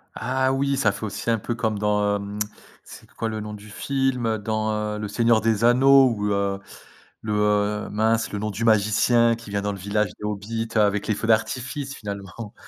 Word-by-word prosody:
Ah 130 +1 0
oui, 140 +1 +1
ça 125 -7 +2
fait 110 - -6
aussi 110 - -4
un 115 - +3
peu 120 +3 -3
comme 110 -2 -1
dans, 105 0 +1
hem 100 +1 -5 0.4
c'est - - -13
quoi 115 - -3
le 110 0 -4
nom 105 0 -6
du 105 +1 -11
film? 135 +1 -1
Heu, 110 -1 0
dans, 110 +1 -1 0.2
heu, - - -5
«Le 105 - -3
Seigneur 115 +1 +3
des 110 0 0
Anneaux», 135 +2 +6
où, 105 - -2
heu, 100 -1 0 0.6
le 110 - -4
heu 105 0 +1
mince, 110 +2 +1
le 105 - -3
nom 110 +1 -2
du 105 +4 -4
magicien 115 +2 +4
qui 115 -2 -12
vient 100 0 -1
dans 105 0 -1
le - - -7
village 100 +2 0
des - - -10
Hobbits, 110 +2 -3
heu, 110 - +5
avec 105 0 +1
les 110 - +2
feux 115 - -4
d'artifice, 130 +5 0
finalement. 100 +1 -7
110 Hz, 215 wpm, -24 LUFS, 105-115 Hz, 0.6 s, Anneaux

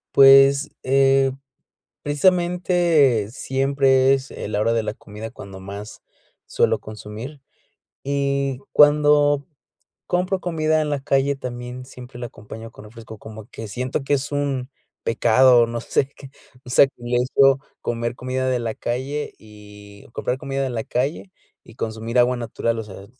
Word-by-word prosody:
Pues, 135 +1 +7
eh, 135 0 +3 0.7
precisamente, 175 - +2
siempre 135 0 +2
es 135 0 -5
en 105 - -7
la 105 - 0
hora 115 +2 +2
de 115 -1 +1
la 110 - -4
comida 105 +2 -9
cuando 95 -4 -11
más 100 +3 -9 0.5
suelo - - +1
consumir, 110 +7 -9 0.6
y 140 -1 -1
cuando 145 -1 +4 0.6
compro 180 +1 0
comida 155 -3 0
en 150 - -2
la 145 -1 -1
calle, 135 +1 +1
también 125 -1 -7
siempre 125 -1 -12
la 120 - -5
acompaño 110 0 -10
con 105 - -14
refresco, 110 -1 -12
como 110 -1 -10
que 110 - -7
siento 130 +6 -3
que 145 +1 +1
es 140 +2 -4
un 140 -2 -2 0.3
pecado, 120 +1 +4
no 120 0 -4
sé 130 - 0
qué, 135 -1 -13 0.3
o - - -10
sea, 135 - +6
y 120 0 -1
eso 135 +1 +4 0.2
comer 120 0 -3
comida 130 +1 -2
de 125 - +1
la 115 -2 -3
calle 135 +5 -4
y 105 -1 -15
comprar 125 +2 -3
comida 135 -1 -3
de 130 - -2
la 110 -2 -3
calle 140 +9 -2 0.3
y 115 - -16
consumir 115 +2 -4
agua 125 +1 +4
natural, 115 -1 -2
o - - -4
sea, 100 -1 -11
130 Hz, 155 wpm, -22 LUFS, 115-140 Hz, 0.7 s, Pues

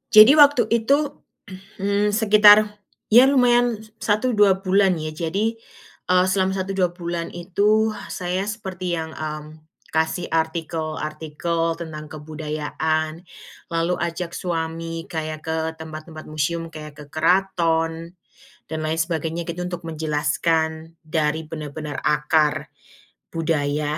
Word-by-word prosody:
Jadi 215 +5 +11
waktu 285 -4 +7
itu, 280 +6 +1 0.6
mmm, 205 +1 +1
sekitar, 210 -1 +6 0.3
ya 245 +4 +8
lumayan 245 -3 +4 0.2
1-2 205 -3 +2
bulan 190 0 +3
ya, 155 -1 -4
jadi, 190 +8 -1 0.5
eee, 180 0 +4
selama 190 0 +1
1-2 190 -2 -1
bulan 170 -1 -4
itu 205 +5 +2 0.2
saya 185 +1 -3
seperti 190 -4 -4
yang, 160 -1 -4
mmm, 155 0 -7 0.2
kasih 160 +2 0
artikel-artikel 160 0 -2
tentang 155 -2 -7
kebudayaan, 155 +1 -3 0.5
lalu 165 +1 +1
ajak 170 0 -3
suami 165 -1 -4
kayak 155 -1 -4
ke 160 - 0 0.2
tempat-tempat 155 0 -8
museum 165 +2 -2
kayak 150 -2 -9
ke - - -13
keraton 165 -1 +1 0.5
dan 160 - -4
lain 155 +1 -1
sebagainya 165 0 -2
gitu, 175 +1 -4
untuk 175 -1 -6
menjelaskan 160 +1 -1
dari 155 0 -1
benar-benar 150 -1 -6
akar 150 0 +2 0.7
budaya 150 -2 -1
165 Hz, 110 wpm, -22 LUFS, 155-190 Hz, 0.7 s, Jadi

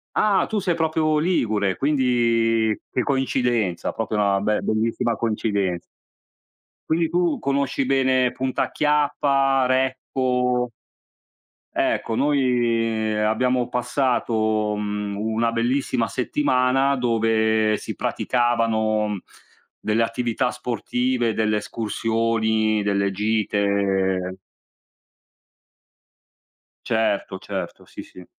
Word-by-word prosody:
Ah! 205 -3 +3
Tu 220 - 0
sei 180 -3 0
proprio 155 -1 +1
ligure, 110 - 0
quindi 115 -5 +2 0.2
che 125 - 0
coincidenza, 125 -8 0
proprio 110 -1 -3
una 100 -1 +2
be 105 +1 0
bellissima 115 +2 0
coincidenza. 100 -5 -1 1.1
Quindi 165 0 +1
tu 175 -2 +1
conosci 140 -1 0
bene 130 -1 +2
Punta 130 0 -2
Chiappa, 140 -2 +2
Recco? 125 -1 0 1.0
Ecco, 115 - 0
noi 120 -5 +1
abbiamo 120 +4 +1
passato, 110 -4 0
mhmm, 105 -1 -3
una 110 +2 0
bellissima 120 0 0
settimana 130 +1 +1
dove 110 -3 +1
si - - -6
praticavano 110 -4 0 0.6
delle 110 +1 0
attività 120 +1 0
sportive, 125 0 -1
delle 110 -1 +1
escursioni, 110 0 0
delle 100 -1 +1
gite. 100 -3 0 2.5
Certo, 110 -4 0
certo. 95 -3 -6
Sì, - - -9
sì. 90 - -14
115 Hz, 90 wpm, -23 LUFS, 110-130 Hz, 2.5 s, Ah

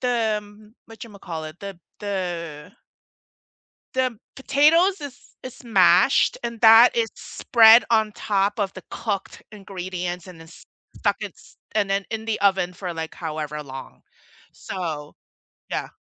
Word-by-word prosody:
the, 230 -4 +1
um, 210 +1 -16 0.2
whatchamacallit, 180 -8 -8
the 195 -3 -8 0.2
the 175 -7 -5 1.2
the 255 -4 0 0.2
potatoes 320 +8 +3
is 280 -4 -8 0.3
is 255 -1 -9
mashed, 240 - +4
and 235 -1 -5
that 225 +2 +8
is 230 -1 +2
spread 230 -1 +5
on 220 -2 +3
top 205 0 -1
of 200 -2 -1
the 185 - -10
cooked 205 -4 -4
ingredients 180 -3 -6
and 180 -3 -12
then 165 - -13
s - - -16 0.3
stuck - - 0
it's - - -10 0.2
and 210 -2 +1
then 195 0 0
in 220 -1 -4
the 225 -1 -2
oven 190 -3 +2
for, 180 -1 -6
like, 160 0 -6
however 155 -2 -5
long. 135 -2 -10 0.5
So 160 -6 -6 0.6
Yeah. - - -3
200 Hz, 135 wpm, -23 LUFS, 175-225 Hz, 1.2 s, that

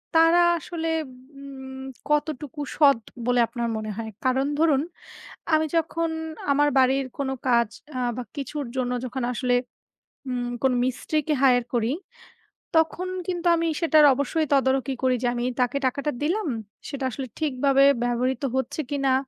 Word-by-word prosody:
তারা 330 +2 +6 0.2
আসলে 330 +1 -4 0.5
উম 265 -1 -9 0.3
কতটুকু 295 -2 -1 0.2
সৎ 280 -5 +6 0.3
বলে 245 0 +3
আপনার 235 0 -3
মনে 215 0 -4
হয়? 225 -1 -5
কারণ 260 +2 +2
ধরুন, 300 -4 +4 0.7
আমি 315 0 +4
যখন 330 0 0 0.4
আমার 290 +1 +4
বাড়ির 265 +1 +3
কোনো 270 -1 -1 0.2
কাজ 235 -2 +4 0.3
আ - - -1 0.2
বা 250 - -3
কিছুর 285 +1 -4
জন্য 250 -1 -1
যখন 255 0 -4
আসলে 250 0 +1 0.7
উম 245 -1 -2
কোনো 260 -1 +3
মিস্ত্রিকে 305 +4 -1
hire 245 -3 +5
করি, 235 +3 +1 0.8
তখন 330 +3 +1 0.2
কিন্তু 350 -1 -1
আমি 335 0 0
সেটার 310 -2 +6
অবশ্যই 285 +4 -1
তদারকি 265 -1 +2
করি 255 -1 +3
যে, - - +2
আমি 240 0 -2 0.2
তাকে 250 +3 +1
টাকাটা 280 +3 -1
দিলাম, 360 +4 0 0.4
সেটা 280 -2 -5
আসলে 260 +3 -5
ঠিকভাবে 275 -2 +3 0.2
ব্যবহৃত 245 +1 0
হচ্ছে 265 +4 -1
কিনা? 275 -2 +1
270 Hz, 145 wpm, -25 LUFS, 250-305 Hz, 0.8 s, তারা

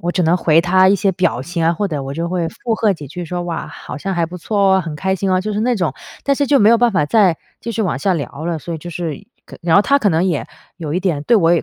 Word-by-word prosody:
我 175 - -1
只 180 - -1
能 170 +3 +3
回 160 -2 +4
她 185 +2 +4
一 200 - +4
些 195 0 +1
表 175 -8 0
情 170 +3 -3
啊， 165 - +3
或 200 +4 -1
者 150 -6 -3
我 135 +1 -5
就 170 +3 -3
会 175 -2 -1
附 225 +7 -3
和 220 -2 +2
几 150 -6 -8
句 175 +5 -6
说： 175 +2 -4
“哇， 170 -1 -4
好 - - -9
像 195 +7 -3
还 170 -1 +1
不 180 +2 -8
错 205 +4 -3 0.2
哦， 190 - +3
很 160 -3 -6
开 190 +4 0
心 190 0 -1
哦。” 185 - +3
就 210 +3 -3
是 210 - -1
那 245 +2 +1
种。 175 -9 -1 0.3
但 280 - +2
是 280 0 -1
就 285 - +5
没 210 -2 +5
有 235 - +6
办 240 0 +3
法 150 -8 +1
再 190 -4 +3 0.2
继 230 - -5
续 225 0 -1
往 180 -8 -1
下 190 +8 +1
聊 145 -1 -5
了， 170 -2 -1
所 170 +2 -6
以 - - -5
就 175 - -9
是 165 -4 -5 0.4
然 165 -1 +2
后 200 - +6
她 280 +5 +3
可 215 - +2
能 165 0 +2
也 170 -6 -1 0.3
有 160 -4 -4
一 180 - 0
点 170 -7 -1
对 235 - +4
我 170 -4 +4
也 170 - +2
175 Hz, 335 characters per minute, -18 LUFS, 165-200 Hz, 0.4 s, 有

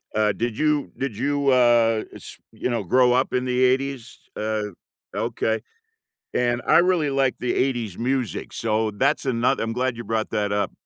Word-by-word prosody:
uh 105 -1 +3
did 115 0 -3
you 150 -2 +1
did 135 -5 -3
you, 140 +2 +1
uh, 120 -3 +4
s - - -11
you - - -3
know, 120 -4 -1
grow 125 +6 +4
up 130 +2 +1
in 125 0 0
the 125 0 +1
‘80s? 130 -1 0 0.2
Uh, 105 -1 -2 0.4
okay. 110 0 -1 0.7
And 120 0 +1
I - - +6
really 175 -4 +2
like 135 -2 +1
the 125 - -1
‘80s 120 -8 -1
music, 125 0 -2
so 110 -1 0
that's 105 - 0
ano 120 -2 +2
I'm 115 0 -2
glad 125 +1 -1
you 120 - -6
brought 110 -1 -2
that 105 -1 -1
up. 100 0 0
120 Hz, 175 wpm, -23 LUFS, 110-130 Hz, 0.7 s, I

